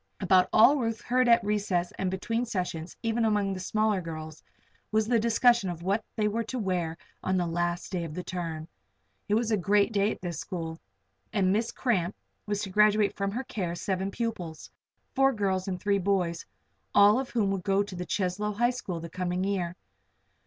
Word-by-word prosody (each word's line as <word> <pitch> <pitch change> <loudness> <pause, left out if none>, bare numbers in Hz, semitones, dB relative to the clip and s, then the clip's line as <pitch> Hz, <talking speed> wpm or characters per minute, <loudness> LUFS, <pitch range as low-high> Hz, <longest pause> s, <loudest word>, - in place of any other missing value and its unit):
About 185 -1 +4
all 270 +7 +7
Ruth 225 -4 -1
heard 255 0 +2
at 235 0 +6
recess 200 -4 0
and 190 - 0
between 225 +6 -1
sessions, 180 -7 -4
even 225 +1 +1
among 205 -3 +1
the 185 - -5
smaller 215 +1 +1
girls, 155 -2 -7 0.5
was 215 0 +2
the 235 -1 +3
discussion 235 -2 +3
of 170 -1 -6
what 200 +4 0
they 215 -2 +1
were 225 +2 -1
to 255 - -4
wear 180 -6 -1 0.2
on 185 0 0
the 175 - +1
last 175 +1 -2
day 180 -3 -2
of 160 -2 -6
the 180 - -4
term. 165 -4 -4 0.6
It 205 - +3
was 225 0 +1
a 215 - +3
great 205 +3 +2
day 205 +1 +2
at - - -6
this 170 -4 -4
school, 165 -2 -5 0.5
and 195 -3 +2
Miss 225 +3 0
Cramp 195 -7 0 0.3
was 205 0 -1
to 195 - -5
graduate 210 0 +4
from 200 0 -1
her 240 +6 -3
care 180 -8 -3
seven 190 +1 -2
pupils 190 -8 -5 0.4
four 270 0 +4
girls 190 -4 -1
and 185 -2 -3
three 200 +1 +1
boys 180 -3 0 0.5
all 205 +4 +7
of 265 - -4
whom 210 -5 +1
would 195 -2 -2
go 195 0 +2
to 200 -2 -8
the 180 - -4
Cheslow 205 +2 -1
High 240 +4 +2
the 180 -9 -5
coming 180 +1 -2
year. 185 -3 -1
195 Hz, 195 wpm, -28 LUFS, 180-215 Hz, 0.6 s, all